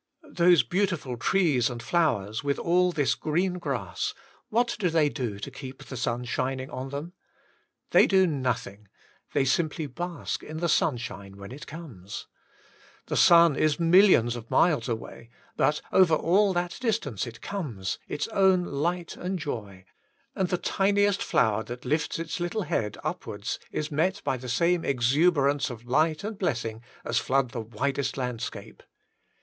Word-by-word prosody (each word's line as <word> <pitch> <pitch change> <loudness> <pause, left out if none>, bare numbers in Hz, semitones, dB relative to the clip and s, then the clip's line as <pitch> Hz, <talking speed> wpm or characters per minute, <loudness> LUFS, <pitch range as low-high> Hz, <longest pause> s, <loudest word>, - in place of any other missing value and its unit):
Those 175 - +5
beautiful 170 - -1
trees 140 -3 +2
and 120 -1 -6
flowers, 115 - 0
with 140 0 0
all 180 +1 +2
this 145 -5 +1
green 180 +4 -1
grass, 130 - -3 0.3
what 235 +2 +1
do 185 -4 +2
they 160 -2 +3
do 120 -8 -4
to 125 +7 -7
keep 130 0 -9
the 130 - -8
sun 120 0 -2
shiuing 130 +3 -3
on 130 +1 -5
them? 145 +6 -6 0.8
They - - +6
do 190 -1 +5
nothing; 130 - -2 0.5
they 135 - +2
simply 155 +3 0
bask 175 +6 -4
in 155 - -7
the 170 +1 0
sunshine, 115 -10 -1
when 100 +2 -9
it 140 +4 -9
comes. 120 - -8 0.8
The - - -3
feun 170 -3 +7
is 155 0 +1
millions 165 - +5
of 115 -1 -8
miles 160 -6 +3
away, 115 0 -6 0.3
but 150 - +1
over 180 -4 +5
all 195 +6 +3
that 175 0 -2
distance 195 - -1
it 115 -1 -9
comes, 120 - -4
its - - -2
own 190 -4 +4
light 170 +3 -2
and 185 +1 -3
joy; 105 - -6 0.5
and 190 -2 0
the 180 - +1
tiniest 200 +2 +2
flower 110 -2 +2
that 120 +1 -8
lifts 150 +5 0
its 165 +2 -4
little 175 +5 -2
head 105 - -2
upwards 105 +2 -4
is 155 +1 -3
met 180 +7 +1
by - - 0
the 125 0 -8
same 170 +7 +2
exuberance 140 +2 +2
of 120 -1 -9
light 155 +6 +1
and 210 -1 -5
blessing 115 - -2 0.2
as 120 0 +1
flood 130 -2 +1
the 125 - -4
WAITING 110 - -6
ON - - -21
GODt 115 - -18
8i - - -12
widest 140 -1 0
landscape. 125 -3 -5
145 Hz, 165 wpm, -27 LUFS, 120-175 Hz, 0.8 s, feun